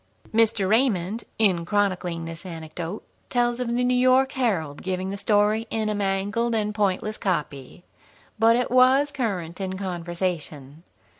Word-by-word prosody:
Mr. 220 -3 +3
Raymond, 220 -2 +1
in 190 -6 +2
chronicling 180 -3 -1
this 165 0 -8
anecdote, 165 +2 -6 0.3
tells 240 0 +1
of 250 - -2
the 250 - +1
New 250 0 +2
York 255 +1 +4
Herald 180 - -1
giving 185 +1 -3
the - - -3
story 210 +2 +2
in 220 -1 -1
a - - 0
mangled 205 +4 0
and 210 -1 -1
pointless 210 +1 -1
copy. 150 -4 -3 0.6
But 230 +1 +5
it 245 0 0
was 260 +3 +5
current 195 - -3
in 190 0 -3
conversation. 170 -5 -4
200 Hz, 145 wpm, -24 LUFS, 175-230 Hz, 0.6 s, But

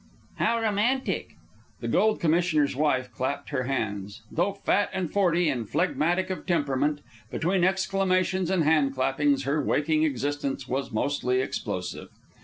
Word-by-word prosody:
"How 230 0 +2
romantic!" 225 +5 0 0.4
The - - -4
Gold 215 0 +2
Commissioner's 160 -4 +2
wife 130 -4 +1
clapped 130 +4 -3
her 130 -4 -1
hands. 105 -4 -3
Though 180 +5 0
fat 200 +1 +1
and 180 -4 -3
forty, 175 -4 +3
and 120 -7 -2
phlegmatic 175 +2 +1
of 185 - -6
temperament, 145 -3 +1 0.3
between 180 +2 0
exclamations 190 -1 +1
and 185 -3 +2
hand 150 -3 +3
clappings 135 +1 +1
her 145 +2 0
waking 155 +3 +1
existence 140 -2 -1
was 135 +2 -2
mostly 125 +2 0
explosive. 130 - -4
155 Hz, 135 wpm, -26 LUFS, 135-185 Hz, 0.4 s, forty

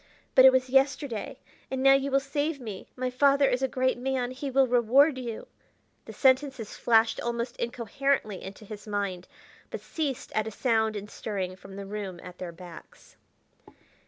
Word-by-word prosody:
But 260 - +8
it 265 - +10
was 255 -1 +1
yesterday. 270 -3 +1 0.3
And 265 0 -2
now 270 0 +7
you 275 0 +2
will 275 0 +3
save 285 +2 -2
me; 215 -6 -8
my 255 0 -2
father 280 +2 +4
is 250 0 0
a 265 - +2
great 260 -1 0
man; 255 -1 -1
he 270 +2 -5
will 270 0 +4
reward 260 +4 +4
you 235 -3 -6 0.3
" - - -42
The - - -9
sentences 260 -4 +1
flashed 225 -1 +3
almost 235 +1 -3
incoherently 235 -2 -1
into 195 +2 -10
his 210 +1 -10
mind, 200 -3 -3 0.4
but - - -5
ceased 290 -6 -4
at 215 0 0
a - - -4
sound 220 -2 +1
and 205 0 -5
stirring 195 -4 -4
from 195 +1 -13
the 200 0 -7
room 195 -3 -6
at 180 0 -11
their 180 -2 -5
backs. 175 0 -14
245 Hz, 180 wpm, -27 LUFS, 210-270 Hz, 0.4 s, it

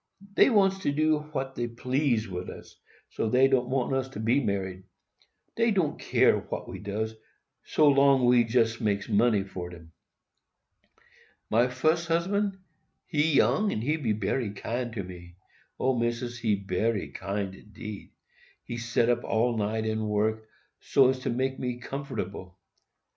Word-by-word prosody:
Dey - - +6
wants 195 -4 +3
to 145 - 0
do 155 +1 +2
what 135 -3 -3
dey 120 -2 -2
please 125 -1 0
wid 90 -1 -5
us, - - -11 0.4
so 110 - -1
dey 130 +3 +5
don't 130 -2 +1
want 130 0 0
us 130 0 -1
to 130 - -8
be 120 +6 +2
married. 95 -3 -2 0.7
Dey 230 0 +2
don't 185 -8 0
care - - +3
what - - -6
we - - -7
does, 105 +2 -3 0.5
so 140 -2 +5
we 120 -1 +5
jest 115 0 +1
makes 100 -2 0
money 105 -1 +3
for 90 -2 -7
dem. 85 -2 -13 1.6
"My 120 +3 +4
fus 155 +7 +1
husband,—he 170 -4 -2
young, 210 +8 +3
and 110 - -2
he 150 +5 +1 0.2
bery 105 +3 -1
kind 120 +4 -3
to 100 -4 -3
me,—O, 90 +8 -5
Missis, 120 +1 -2
he 110 -3 +2
bery 100 +2 -1
kind 100 -1 -4
indeed. 105 +1 -9 0.5
He 120 - -6
set 120 0 +1
up 120 0 +1
all 115 +2 +1
night 110 +1 -1
and 110 -1 -1
work, 110 +1 0 0.3
so 135 -2 +4
as 130 - -4
to - - -3
make 130 +2 -1
me 125 -1 -3
comfortable. 120 -9 -6
120 Hz, 150 wpm, -28 LUFS, 105-135 Hz, 1.6 s, Dey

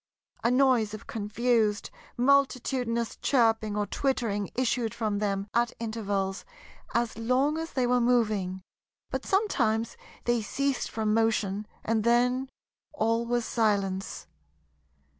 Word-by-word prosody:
A 235 - +3
noise 250 -5 +3
of 215 - -11
confused, 215 0 0 0.3
multitudinous 250 -3 +1
chirping 225 -5 +2
or 210 - +1
twittering 215 -4 -1
issued 240 -3 0
from 215 -3 -1
them 200 -1 -1
at 235 0 +1
intervals 200 -4 -2 0.5
as 235 -1 0
long 260 +7 +1
as 325 0 -5
they 255 -2 +1
were 245 0 +2
moving; 210 -6 +1 0.5
but - - -3
sometimes 235 - +1 0.3
they 240 -1 +1
ceased 275 +5 -1
from 215 -1 -1
motion, 215 -2 +1 0.2
and 220 -1 +1
then 250 +3 +2 0.4
all 230 -4 0
was 240 -1 0
silence. 200 -5 0
230 Hz, 120 wpm, -28 LUFS, 210-250 Hz, 0.5 s, A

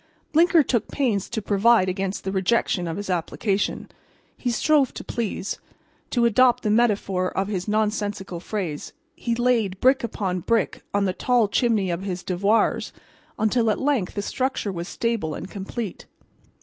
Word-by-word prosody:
Blinker 330 0 +5
took 235 -5 0
pains 230 -9 -1
to 220 -3 -3
provide 205 0 +4
against 190 +1 -2
the 190 - -2
rejection 190 -2 +1
of 165 - -3
his 205 - -5
application. 195 +3 -1 0.5
He 250 - -2
strove 275 +3 +2
to - - -6
please. 220 -3 -3 0.5
To 240 -2 +2
adopt 245 +2 +4
the 210 - +1
metaphor 200 -5 +2
of 195 +1 0
his 185 -2 -3
nonsensical 210 -3 -1
phrase, 175 -6 -4 0.2
he 235 -1 -2
laid 230 -6 +1
brick 265 +1 +4
upon 195 -5 -2
brick 230 +6 0
on 200 0 +1
the 185 - 0
tall 245 +1 +2
chimney 210 -4 +1
of 170 +1 -2
his 185 -2 -4
devoirs 200 +5 +1 0.5
until, 225 +1 +2
at 210 - 0
length, 270 -9 0
the 205 - -2
structure 255 -3 -1
was 170 -1 -5
stable 225 -9 -2
and 185 - -7
complete. 200 +1 -6
210 Hz, 160 wpm, -24 LUFS, 190-235 Hz, 0.5 s, Blinker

